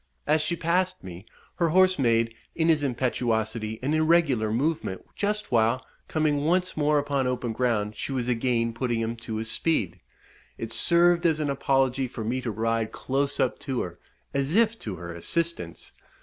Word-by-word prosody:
As 155 Hz, +1 st, +3 dB
she 160 Hz, +2 st, 0 dB
passed 180 Hz, +3 st, 0 dB
me, 90 Hz, +3 st, -9 dB, 0.3 s
her 170 Hz, -2 st, +2 dB
horse 185 Hz, 0 st, +4 dB
made, 115 Hz, -2 st, +2 dB, 0.2 s
in 165 Hz, 0 st, +2 dB
his 155 Hz, -2 st, +4 dB
impetuosity, 115 Hz, -4 st, -1 dB
an 145 Hz, +3 st, 0 dB
irregular 155 Hz, -9 st, +3 dB
movement, 130 Hz, -, -1 dB
just 210 Hz, +1 st, -2 dB
while, 115 Hz, +2 st, +2 dB, 0.2 s
coming 150 Hz, -2 st, +1 dB
once 180 Hz, +3 st, +1 dB
more 150 Hz, 0 st, +2 dB
upon 140 Hz, -2 st, 0 dB
open 125 Hz, -2 st, -2 dB
ground, 110 Hz, -3 st, 0 dB
she 120 Hz, -, -4 dB
was 125 Hz, -3 st, -1 dB
again 115 Hz, -1 st, +1 dB
putting 120 Hz, -1 st, -1 dB
him 115 Hz, +1 st, -2 dB
to 115 Hz, -1 st, -6 dB
his 110 Hz, 0 st, -3 dB
speed. 110 Hz, -, 0 dB, 0.6 s
It 115 Hz, 0 st, -5 dB
served 175 Hz, 0 st, +4 dB
as 155 Hz, -2 st, +1 dB
an 145 Hz, -2 st, 0 dB
apology 135 Hz, -1 st, +1 dB
for 115 Hz, -2 st, -6 dB
me 125 Hz, +4 st, -1 dB
to 125 Hz, -, -3 dB
ride 115 Hz, +1 st, -1 dB
close 140 Hz, +1 st, -2 dB
up 130 Hz, -, +1 dB
to 130 Hz, -3 st, -2 dB
her, 85 Hz, -2 st, -6 dB, 0.3 s
as 140 Hz, +4 st, 0 dB
if 230 Hz, 0 st, +3 dB
to 105 Hz, -4 st, -5 dB
her 85 Hz, 0 st, -7 dB
assistance. 155 Hz, -, -3 dB
130 Hz, 175 wpm, -26 LUFS, 115-155 Hz, 0.6 s, horse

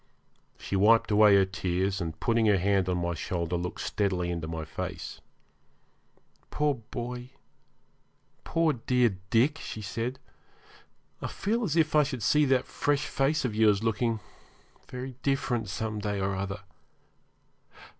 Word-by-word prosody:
She -, -, -4 dB
wiped 110 Hz, +3 st, +4 dB
away 105 Hz, -1 st, +7 dB
her 100 Hz, -1 st, +5 dB
tears, 95 Hz, 0 st, -1 dB
and, 80 Hz, -2 st, -4 dB
putting 115 Hz, -1 st, +2 dB
her 105 Hz, -2 st, +5 dB
hand 95 Hz, 0 st, +2 dB
on 90 Hz, -, +1 dB
my 85 Hz, 0 st, -1 dB
shoulder, 85 Hz, +1 st, -2 dB
looked 90 Hz, +1 st, -4 dB
steadily 95 Hz, -4 st, -1 dB
into 85 Hz, -2 st, -3 dB
my 80 Hz, -1 st, -4 dB
face. 80 Hz, -, -6 dB, 1.3 s
'Poor 150 Hz, -1 st, +1 dB, 0.2 s
boy 125 Hz, 0 st, -5 dB, 1.1 s
poor, 165 Hz, -2 st, +2 dB
dear 125 Hz, -4 st, +1 dB
Dick,' 135 Hz, +7 st, +3 dB
she 110 Hz, -, -6 dB
said, 115 Hz, +6 st, -3 dB, 1.0 s
'I -, -, -2 dB
feel 230 Hz, +4 st, -1 dB
as 165 Hz, -7 st, -1 dB
if 155 Hz, -2 st, +2 dB
I 150 Hz, -, +7 dB
should 135 Hz, -6 st, -3 dB
see 150 Hz, +6 st, +4 dB
that 130 Hz, -2 st, +2 dB
fresh 145 Hz, -1 st, 0 dB
face 135 Hz, +2 st, 0 dB
of 120 Hz, -, -1 dB
yours 105 Hz, -1 st, +3 dB
looking 115 Hz, 0 st, 0 dB, 0.7 s
very 125 Hz, 0 st, -6 dB
different 125 Hz, -6 st, 0 dB
some 110 Hz, +2 st, -3 dB
day 105 Hz, -1 st, -2 dB
or 95 Hz, 0 st, -1 dB
other. 95 Hz, +1 st, -4 dB
110 Hz, 145 wpm, -28 LUFS, 95-130 Hz, 1.3 s, away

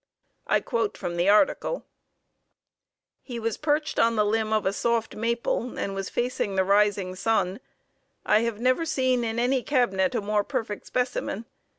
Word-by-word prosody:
I -, -, +3 dB
quote 230 Hz, -4 st, -1 dB
from 175 Hz, -, -4 dB
the 175 Hz, +3 st, +2 dB
article: 245 Hz, -, +2 dB, 1.4 s
"He 245 Hz, -3 st, -7 dB
was 230 Hz, -1 st, -1 dB
perched 300 Hz, 0 st, 0 dB
on 230 Hz, 0 st, +4 dB
the 210 Hz, -1 st, +3 dB
limb 220 Hz, +1 st, 0 dB
of 215 Hz, -2 st, +1 dB
a 190 Hz, -, +1 dB
soft 230 Hz, +1 st, 0 dB
maple 235 Hz, +2 st, -1 dB
and 195 Hz, -, -2 dB
was 195 Hz, -1 st, -4 dB
facing 240 Hz, -5 st, -1 dB
the 190 Hz, -, +3 dB
rising 200 Hz, -1 st, +2 dB
sun. 195 Hz, 0 st, 0 dB, 0.7 s
I 210 Hz, -, +4 dB
have 230 Hz, -2 st, -2 dB
never 255 Hz, +6 st, +2 dB
seen 260 Hz, -6 st, +1 dB
in 225 Hz, 0 st, -2 dB
any 250 Hz, +2 st, +2 dB
cabinet 195 Hz, -10 st, +1 dB
a -, -, +1 dB
more 205 Hz, 0 st, +1 dB
perfect 210 Hz, 0 st, -4 dB
specimen. 245 Hz, -3 st, -2 dB
225 Hz, 165 wpm, -26 LUFS, 200-245 Hz, 1.4 s, on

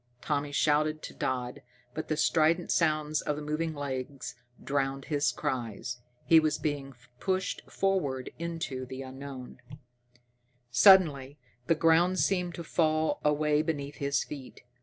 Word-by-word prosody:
Tommy 145 Hz, +2 st, -2 dB
shouted 155 Hz, +1 st, +1 dB
to -, -, -7 dB
Dodd, 125 Hz, -1 st, -3 dB, 0.3 s
but 155 Hz, -, -5 dB
the 155 Hz, -, -1 dB
strident 160 Hz, +2 st, +2 dB
sounds 155 Hz, -2 st, +1 dB
of 150 Hz, -, -1 dB
the 150 Hz, -, -6 dB
moving 155 Hz, +2 st, -2 dB
legs 135 Hz, -1 st, -5 dB, 0.3 s
drowned 135 Hz, -1 st, -1 dB
his 145 Hz, -2 st, +1 dB
cries. 125 Hz, -4 st, -4 dB, 0.3 s
He 165 Hz, -, +7 dB
was 155 Hz, -1 st, +1 dB
being 140 Hz, -3 st, -3 dB, 0.2 s
pushed 190 Hz, -1 st, -1 dB
forward 150 Hz, -10 st, -1 dB
into 165 Hz, -6 st, -4 dB
the 130 Hz, +1 st, -6 dB
unknown. 130 Hz, -1 st, -9 dB, 1.1 s
Suddenly 145 Hz, -2 st, +5 dB, 0.3 s
the 165 Hz, -, +4 dB
ground 165 Hz, +3 st, +4 dB
seemed 180 Hz, -3 st, +1 dB
to 170 Hz, -, -6 dB
fall 155 Hz, -1 st, +1 dB
away 150 Hz, 0 st, +2 dB
beneath 150 Hz, -2 st, -3 dB
his 140 Hz, 0 st, 0 dB
feet. 140 Hz, -3 st, -10 dB
150 Hz, 135 wpm, -29 LUFS, 135-160 Hz, 1.1 s, He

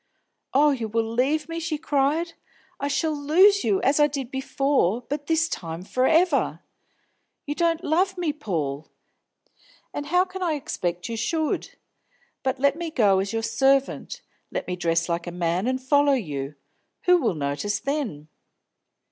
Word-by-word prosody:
"Oh, 290 Hz, +3 st, +5 dB
you 240 Hz, -5 st, -2 dB
will 225 Hz, +1 st, 0 dB
leave 270 Hz, +7 st, 0 dB
me!" 330 Hz, 0 st, -4 dB
she 325 Hz, -2 st, -2 dB
cried. 300 Hz, +3 st, 0 dB, 0.5 s
"I 280 Hz, -, -1 dB
shall 310 Hz, +3 st, 0 dB
lose 370 Hz, +8 st, +4 dB
you, 390 Hz, -, +2 dB
as 280 Hz, +3 st, +3 dB
I 295 Hz, -, +6 dB
did 275 Hz, -3 st, -5 dB
before, 265 Hz, -5 st, +1 dB
but 290 Hz, 0 st, -4 dB
this 325 Hz, 0 st, +2 dB
time 165 Hz, -, -5 dB
for 255 Hz, +6 st, +1 dB
ever! 335 Hz, +3 st, +2 dB, 0.8 s
You 290 Hz, -, -2 dB
don't 335 Hz, +1 st, 0 dB
love 370 Hz, +4 st, +1 dB
me, 335 Hz, -4 st, -1 dB
Paul! 160 Hz, -, -3 dB, 1.0 s
And 290 Hz, 0 st, -4 dB
how 360 Hz, +4 st, +3 dB
can 380 Hz, 0 st, -8 dB
I 345 Hz, -3 st, +1 dB
expect 180 Hz, -, -3 dB
you 230 Hz, -, -4 dB
should? 310 Hz, +7 st, -1 dB, 0.7 s
But 260 Hz, 0 st, -1 dB
let 280 Hz, +1 st, +2 dB
me 335 Hz, 0 st, -4 dB
go 205 Hz, -10 st, +3 dB
as 195 Hz, +1 st, -2 dB
your 225 Hz, 0 st, -2 dB
servant. 270 Hz, +4 st, +1 dB, 0.3 s
Let -, -, -4 dB
me 180 Hz, -, -3 dB
dress 170 Hz, -1 st, 0 dB
like 170 Hz, 0 st, -2 dB
a -, -, -3 dB
man, 175 Hz, +4 st, -1 dB
and 260 Hz, 0 st, 0 dB
follow 285 Hz, +2 st, +3 dB
you. 150 Hz, -, -3 dB, 0.5 s
Who 360 Hz, 0 st, +5 dB
will 230 Hz, -, 0 dB
notice 145 Hz, +8 st, -2 dB
then?" 275 Hz, -, -3 dB
275 Hz, 165 wpm, -25 LUFS, 200-315 Hz, 1.0 s, I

